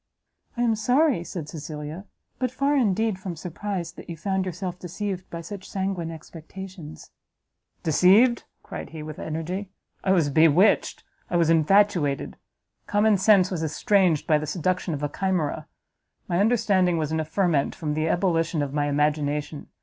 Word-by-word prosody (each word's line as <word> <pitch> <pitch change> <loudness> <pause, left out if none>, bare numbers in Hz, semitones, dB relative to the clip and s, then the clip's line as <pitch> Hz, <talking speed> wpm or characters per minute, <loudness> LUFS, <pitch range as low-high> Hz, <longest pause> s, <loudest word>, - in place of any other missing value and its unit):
"I 240 - +1
am 230 -2 +2
sorry," 250 - +2
said 170 -3 -6
Cecilia, 155 +3 -7 0.3
"but 255 0 0
far 275 +4 0
indeed 220 -5 +1
from 185 -2 -5
surprised, 175 +1 -5
that - - -11
you 170 - -6
found 190 +2 -1
yourself 180 0 -5
deceived 185 +1 -5
by 170 - -6
such 190 +3 -9
sanguine 190 -4 -2
expectations." 165 +1 -10 0.7
"Deceived!" 200 - +4 0.2
cried - - -7
he, 160 -1 -8
with 155 0 -8
energy, 175 +5 -4 0.3
"I 190 - +3
was 160 -6 +2
bewitched, 160 +7 +4 0.3
I - - -2
was 165 -1 +3
infatuated! 165 -3 +2 0.5
common 205 -1 +3
sense 190 -2 +5
was 175 -4 -2
estranged 165 +1 +2
by 155 -4 +3
the 155 - -5
seduction 180 -1 -1
of 145 - -6
a - - +2
chimera; 180 -1 -2 0.6
my 175 - 0
understanding 195 -5 +2
was 155 -1 -2
in 160 - 0
a - - 0
ferment 160 -2 0
from 155 -4 -3
the 155 +1 0
ebullition 165 -3 +1
of 140 -1 -5
my 145 0 0
imagination! 150 0 -1
175 Hz, 155 wpm, -25 LUFS, 155-195 Hz, 0.7 s, sense